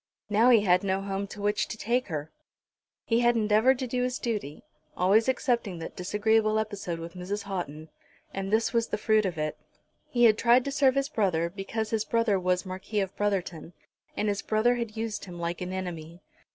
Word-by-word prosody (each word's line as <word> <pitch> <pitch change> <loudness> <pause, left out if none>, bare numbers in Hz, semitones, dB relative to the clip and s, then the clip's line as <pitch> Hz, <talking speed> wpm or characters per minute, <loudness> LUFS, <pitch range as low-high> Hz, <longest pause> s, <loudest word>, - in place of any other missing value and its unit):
Now 225 +4 +5
he 235 -4 +6
had 185 -2 +3
no 190 -1 0
home 195 0 -3
to 205 0 -9
which 205 0 +1
to 220 - -6
take 240 +4 0
her. 155 -3 -5 0.7
He 230 0 +2
had 240 0 +3
endeavoured 220 +4 +3
to 260 - -3
do 250 0 -2
his 250 +1 -1
duty, 210 - -4 0.3
always 210 +7 +4
excepting 235 -7 0
that 165 - -7
disagreeable 215 +3 +1
episode 205 -6 -3
with 165 +1 -8
Mrs. 190 +3 -4
Houghton, 165 -6 -5 0.5
and 195 0 -4
this 225 +3 +2
was 230 -1 +1
the - - -2
fruit 215 0 +2
of 175 -3 -5
it. 155 0 -3 0.5
He 240 -1 +1
had 220 -2 +6
tried 245 +1 +4
to 280 - -2
serve 275 -2 +3
his 275 0 +1
brother, 175 - 0
because 215 +3 -4
his 220 -2 +1
brother 230 -4 +1
was 180 +1 0
Marquis 190 +3 -3
of 190 -1 -4
Brotherton, 180 -5 -2 0.4
and 210 - 0
his 200 -1 0
brother 220 +3 +2
had 230 -2 -4
used 220 -1 -3
him 175 -2 -9
like 170 +1 -3
an 180 0 -4
enemy. 175 -2 -6
205 Hz, 200 wpm, -28 LUFS, 180-230 Hz, 0.7 s, he